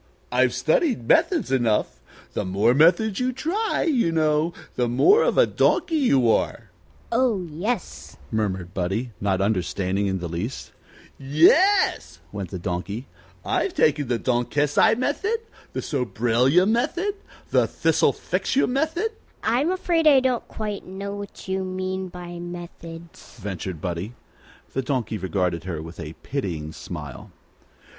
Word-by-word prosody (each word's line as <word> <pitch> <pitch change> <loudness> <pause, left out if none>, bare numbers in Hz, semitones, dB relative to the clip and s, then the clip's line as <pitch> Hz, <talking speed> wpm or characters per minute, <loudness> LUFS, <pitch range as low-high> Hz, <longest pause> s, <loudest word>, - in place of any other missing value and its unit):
"I've - - +2
studied 305 - +1
methods 130 - +3
enough. 120 -5 +1 0.3
The - - -1
more 100 +6 +2
methods 175 - +4
you 255 0 +1
try, 345 - -1
you 250 - +2
know, 155 0 +2 0.2
the 125 - +1
more 380 - +5
of - - +1
a - - +7
donkey 325 - +1
you 140 - +3
are." - - -1 0.4
"Oh, 230 -6 +1
yes," 180 +7 -4
murmured 95 -5 -2
Buddie, 100 +7 -2
not 95 -2 +1
understanding 100 0 0
in 95 -1 0
the 90 -1 -4
least. 85 +10 -5 0.5
"Yes," 155 - +3
went 100 -3 -5
on - - -25
the 95 - -4
Donkey; 100 +7 -3 0.4
"I've 385 - 0
taken 145 -2 +2
the 120 -1 +1
Donkesi 135 - +2
Method, 300 - 0 0.4
the - - -2
Sobraylia 125 - +2
Method, 335 - 0 0.4
the - - +4
Thistlefixu 270 - +1
Method 320 - 0 0.2
" - - -34
"I'm 250 +8 +2
afraid 350 -3 +1
I 280 -3 +8
don't 255 -2 0
quite 210 -2 -5
know 200 +2 -6
what 205 -1 -9
you 190 0 -1
mean 185 0 -3
by 175 -1 -8
'methods,'" 170 -3 -10
ventured 95 -4 -5
Buddie. 90 +6 -4 0.6
The 135 - 0
Donkey 125 -5 -2
regarded 90 -3 -1
her 85 -4 -4
with 80 +2 -9
a 75 +1 -6
pitying 85 - -3
smile. 75 -5 -8
150 Hz, 140 wpm, -24 LUFS, -, 0.6 s, I